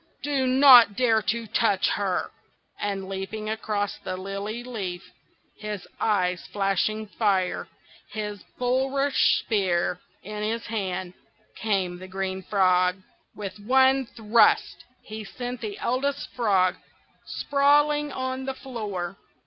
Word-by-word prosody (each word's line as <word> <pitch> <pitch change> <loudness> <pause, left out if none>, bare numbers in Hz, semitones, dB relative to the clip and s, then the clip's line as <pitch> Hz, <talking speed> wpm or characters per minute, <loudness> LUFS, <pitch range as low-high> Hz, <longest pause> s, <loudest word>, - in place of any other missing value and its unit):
do 275 -2 0
not 255 -5 +8
dare 225 -2 +3
to 230 +2 -1
touch 215 -2 +2
her!" 195 -3 -1 0.5
and 195 -2 -3
leaping 195 +3 -5
across 210 -2 -2
the 185 -1 -5
lily 200 +5 -5
leaf, 195 -8 -5 0.6
his 210 -3 -6
eyes 180 -4 +1
flashing 205 +2 0
fire, 200 -3 0 0.4
his 210 -2 -5 0.2
bulrush 265 +2 +2
spear 180 -4 0 0.2
in 210 +2 -6
his 225 +2 -2
hand, 190 -4 -3 0.4
came 190 -4 -1
the 185 - -9
Green 190 0 -3
Frog. 185 -2 +3 0.4
With 205 0 -7
one 265 +4 +3
thrust 225 0 +2 0.2
he 215 0 -7
sent 245 +4 -6
the 210 -3 -5
Eldest 275 +3 -2
Frog 195 -6 +2 0.5
sprawling 295 +1 +2
on 260 0 -3
the 270 0 -3
floor. 205 -8 -5
210 Hz, 115 wpm, -25 LUFS, 195-250 Hz, 0.6 s, not